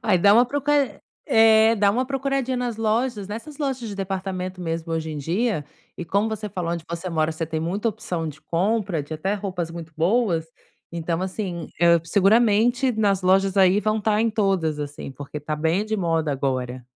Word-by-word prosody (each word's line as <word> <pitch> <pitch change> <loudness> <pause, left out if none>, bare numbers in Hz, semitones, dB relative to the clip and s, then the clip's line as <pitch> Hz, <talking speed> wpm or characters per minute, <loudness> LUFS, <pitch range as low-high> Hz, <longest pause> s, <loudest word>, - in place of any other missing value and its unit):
Aí 185 - +3
dá 200 +3 +6
uma 240 - +6
procura 285 -1 0 0.3
eh, 225 0 +6
dá 200 -1 +4
uma 250 +4 0
procuradinha 270 -1 -1
nas 245 -2 -2
lojas, 225 -1 0
nessas 230 +9 -8
lojas 270 -4 -2
de 205 - -6
departamento 185 -1 -4
mesmo, 165 -1 -3
hoje 160 -1 -2
em 150 - -5
dia. 180 - -1 0.3
E 175 - -4
como 200 +5 +1
você 215 -1 -4
falou, 175 -2 -3
onde 170 -2 -4
você 170 +2 -4
mora 160 -1 0
você 160 +1 -4
tem 160 0 -3
muita 195 +7 -1
opção 175 -7 -4
de 155 +1 -10
compra, 185 +1 0
de 145 +3 -10
até 190 +6 -1
roupas 185 -4 -4
muito 165 -1 -8
boas, 175 -1 +1 0.5
então, 165 0 -2
assim, 185 -2 -4 0.2
hã, 170 -1 +6
seguramente 225 +6 +3
nas 205 -3 +1
lojas 190 +1 +2
aí 190 +1 +5
vão 215 0 0
estar 210 0 +1
em 225 0 +2
todas, 190 -8 0
assim, 145 -1 -6
porque 145 +2 -7
está 150 +1 -4
bem 165 +6 +1
de 220 0 -2
moda 165 -5 0
agora. 130 -2 -2
190 Hz, 190 wpm, -23 LUFS, 165-220 Hz, 0.5 s, dá